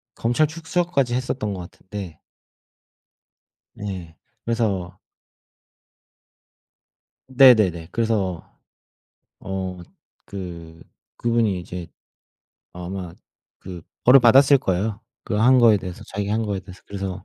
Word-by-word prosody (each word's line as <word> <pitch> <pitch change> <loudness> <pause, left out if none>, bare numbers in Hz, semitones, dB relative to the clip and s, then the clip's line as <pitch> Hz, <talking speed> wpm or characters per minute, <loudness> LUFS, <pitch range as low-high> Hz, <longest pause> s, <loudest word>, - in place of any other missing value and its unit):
검찰 120 +7 +1
출석 170 +2 -2
까지 130 -5 +1
했었던 125 -4 -2
것 95 - -6
같은데 95 -4 -9 1.6
예. 95 -5 -7 0.3
그래서 105 -7 -1 2.3
네네네. 110 -11 +5
그래서 105 -7 -1 1.0
어 95 -1 -5 0.5
그 85 -4 -8 0.3
그분이 115 -5 +1
이제 90 0 -7 0.9
아마 90 0 -6 0.5
그 90 -3 -9 0.2
벌을 130 +2 +8
받았을 135 +4 +6
거예요, 100 0 -2 0.2
그 - - -4
한 125 +4 +5
거에 115 -3 +6
대해서 90 -2 -7
자기가 100 +1 -4
한 110 +1 0
거에 100 -2 -2
대해서. 95 -1 -14
그래서 95 -2 -5
100 Hz, 210 characters per minute, -22 LUFS, 90-120 Hz, 2.3 s, 벌을